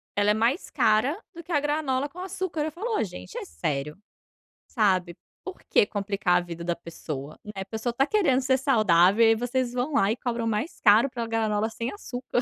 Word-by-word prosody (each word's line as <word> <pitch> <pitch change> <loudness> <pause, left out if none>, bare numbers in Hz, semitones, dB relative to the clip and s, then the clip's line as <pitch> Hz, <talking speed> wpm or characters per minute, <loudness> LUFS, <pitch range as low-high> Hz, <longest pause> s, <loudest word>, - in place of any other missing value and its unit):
ela 205 +1 +3
é - - +4
mais 230 - 0
cara 245 - +2 0.2
do 340 - -9
que 340 - -10
a 295 - +3
granola 290 -2 -1
com 350 - -12
açúcar. 370 -4 -3
Eu 310 - -3
falo 430 +7 -3
"Oh, - - +1
gente, 90 - -8
é - - -5
sério?" 140 - -3 0.7
Sabe, 185 -6 +1 0.3
por 375 - -8
que - - +5
complicar 200 -3 0
a - - 0
vida 170 -1 -7
da 175 0 -1
pessoa, 155 -4 -7
né, 210 - -8
a - - -6
pessoa 220 +4 -3
está 270 +4 +1
querendo 320 -11 +2
ser 260 0 +2
saudável 215 - +4
e - - +6
aí - - +5
vocês 245 +1 -1
vão 250 +4 -2
lá 205 -5 +3
e - - -3
cobram 235 -2 -3
mais 225 - -2
caro 225 +5 +5
pela 235 -2 -4
granola 220 -1 0
sem 230 +2 -4
açúcar. 250 - -3
230 Hz, 215 wpm, -26 LUFS, 200-275 Hz, 0.7 s, e